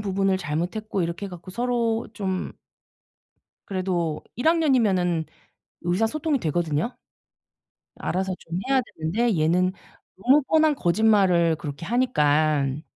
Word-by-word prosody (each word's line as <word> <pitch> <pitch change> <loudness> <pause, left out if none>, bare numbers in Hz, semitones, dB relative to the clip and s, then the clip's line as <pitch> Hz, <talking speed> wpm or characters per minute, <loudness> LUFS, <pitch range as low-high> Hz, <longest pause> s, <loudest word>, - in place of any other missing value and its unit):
부분을 195 -1 +1
잘못했고 180 +5 -2
이렇게 170 +4 -3
해 - - -9
갖고 175 0 -10
서로 235 0 0
좀 190 -3 -3 1.1
그래도 180 -5 -2
1 245 - -1
학년이면은 215 - +2 0.6
의사소통이 225 - 0
되거든요. 165 - -1 1.0
알아서 190 +1 -2
좀 170 +2 -5
해야 270 -1 +3
되는데 205 +3 -1
얘는 180 +4 +2 0.5
너무 265 +9 +4
뻔한 310 +1 +3
거짓말을 180 -5 +3
그렇게 145 +2 -6
하니깐 155 - +1
190 Hz, 270 characters per minute, -24 LUFS, 170-230 Hz, 1.1 s, 너무